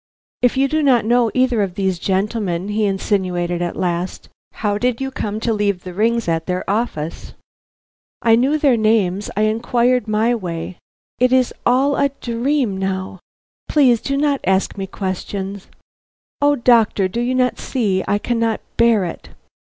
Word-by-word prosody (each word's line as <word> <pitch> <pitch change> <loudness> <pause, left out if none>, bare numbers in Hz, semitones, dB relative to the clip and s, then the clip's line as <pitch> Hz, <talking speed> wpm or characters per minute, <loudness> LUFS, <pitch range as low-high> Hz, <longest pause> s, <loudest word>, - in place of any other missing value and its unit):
"If 245 +1 +2
you 270 +1 +3
do 310 +3 0
not 255 -6 +3
know 240 0 +3
either 255 -3 +2
of 190 -3 -2
these 190 -3 -1
gentlemen," 195 -1 -1
he 210 +1 0
insinuated 185 -3 -1
at 175 -1 -2
last, 175 0 -3 0.2
"how 205 -1 -1
did 245 0 0
you 270 0 -3
come 215 -4 -3
to 230 0 0
leave 205 -3 -1
the 180 - -7
rings 230 +3 +1
at 165 -1 -1
their 180 0 -2
office?" 195 -7 -3 0.9
"I 225 -1 +5
knew 265 +6 +2
their 280 -5 +3
names 210 -3 +1
I 215 - +2
inquired 235 +2 +1
my 215 +3 +2
way 175 -5 -5 0.4
It 250 +1 +3
is 255 -1 +3
all 270 +4 +3
a 280 - +2
dream 240 -2 -1
now. 190 -1 -3 0.5
Please, 255 -6 +4
please - - -6
do 275 - +1
not 285 -1 +1
ask 190 +1 +1
me 195 -1 -5
questions. 195 +1 -5 0.7
O 290 0 +4
doctor! 230 -6 +3
do 230 +6 -3
you 250 +2 0
not 250 -1 +1
see 205 -8 -1
I 205 - +2
cannot 230 0 -1 0.2
bear 230 -4 +4
it?" 170 - -7
215 Hz, 165 wpm, -19 LUFS, 190-245 Hz, 0.9 s, I